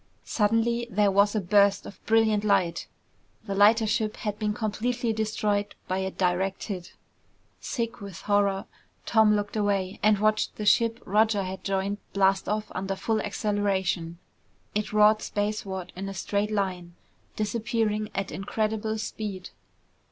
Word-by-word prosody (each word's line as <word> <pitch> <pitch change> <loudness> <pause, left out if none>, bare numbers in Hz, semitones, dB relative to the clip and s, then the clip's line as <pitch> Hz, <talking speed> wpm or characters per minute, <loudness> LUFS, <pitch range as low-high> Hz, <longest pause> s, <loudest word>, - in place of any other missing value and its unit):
Suddenly 230 +2 +1
there 205 -1 +2
was 200 +2 +3
a - - +2
burst 200 +1 +3
of - - -11
brilliant 220 -2 +3
light. 185 -5 +1 0.6
The 200 - -3
lighter 215 +3 +5
ship 215 0 -1
had 210 -2 -4
been 210 -1 0
completely 225 +2 -1
destroyed 215 -1 -1
by 185 +1 -1
a 190 0 -1
direct 185 +1 -1
hit. 185 -5 -6 0.7
Sick 235 -1 -4
with 200 -3 -8
horror, 200 -1 +1 0.4
Tom 220 -2 +4
looked 205 0 -3
away 200 -2 0
and 210 0 +4
watched 215 +1 +1
the 210 - -5
ship 230 +2 +3
Roger 210 0 +2
had 190 0 -6
joined 195 +1 -1
blast 195 -1 +2
off 210 0 -2
under 195 +1 -3
full 220 +2 -1
acceleration. 195 -5 -1 0.6
It 210 0 -2
roared 215 0 +5
spaceward 205 -3 -3
in 195 +2 -5
a 195 - -7
straight 200 +3 -1
line, 185 -4 -2 0.4
disappearing 215 -1 -1
at 195 0 -2
incredible 215 +2 -2
speed. 210 -4 -5
205 Hz, 145 wpm, -27 LUFS, 195-215 Hz, 0.7 s, lighter